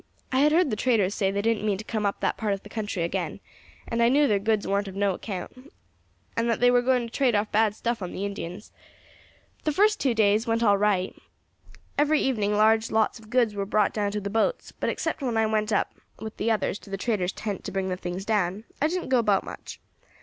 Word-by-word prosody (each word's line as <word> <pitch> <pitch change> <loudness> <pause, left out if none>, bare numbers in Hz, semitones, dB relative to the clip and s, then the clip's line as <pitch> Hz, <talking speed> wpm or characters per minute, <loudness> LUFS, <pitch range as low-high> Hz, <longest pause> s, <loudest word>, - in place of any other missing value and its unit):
I 260 - +2
had 295 +2 +5
heard 330 -3 +3
the - - 0
traders 210 -4 +2
say 200 -3 0
as 195 - -1
they 200 - 0
didn't 225 -1 +1
mean 205 -2 +1
to 210 - -7
come 215 -2 -1
up 200 - -3
that - - +1
part 215 -3 -1
of 195 - -5
the - - -12
country 205 -6 -3
agin, 170 - -3 0.5
and 230 0 -1
I 235 - +5
knew 290 +3 +4
their 205 -3 +2
goods 215 0 0
warn't 200 +1 0
of 190 - -8
no 200 -1 +1
account, 230 +9 -7 0.6
and 230 +1 0
that 230 - +1
they 245 0 +5
were 245 0 +4
going 250 -1 +2
to 230 - -11
trade 255 -5 +2
off 210 +1 0
bad 215 -1 +2
stuff 235 -1 -2
on 180 - -4
the 195 - -4
Indians. 200 0 -6 0.9
The 305 - +1
first 420 +7 +3
two 255 -4 +1
days 210 -1 +4
things 235 - -9
went 230 +1 +1
on 220 - +5
all 200 - +5
right; 200 -3 +1 0.8
every 300 +1 +3
evening 210 -6 0
large 220 +1 +4
lots 220 +1 +1
of 215 -1 -16
goods 240 -3 +2
were 200 -1 -2
brought 210 +1 +1
down 205 -2 0
to 210 - -1
the 200 0 -5
boats, 225 - 0
but - - -3
except 320 -1 -2
when 245 -4 -1
I 220 - +3
went 215 0 0
up 205 - +1 0.2
with 220 -1 -8
the 220 - 0
others 215 -2 0
to - - -15
the 195 - -3
traders' 195 -4 -1
tent 205 -3 -5
to - - -4
bring 190 0 -2
the 185 - -1
things 180 +1 -5
down 205 -2 0 0.2
I 300 - +4
didn't 360 -1 -3
go 260 -2 +4
about 205 -4 +2
much. - - -9
215 Hz, 250 wpm, -26 LUFS, 200-235 Hz, 0.9 s, had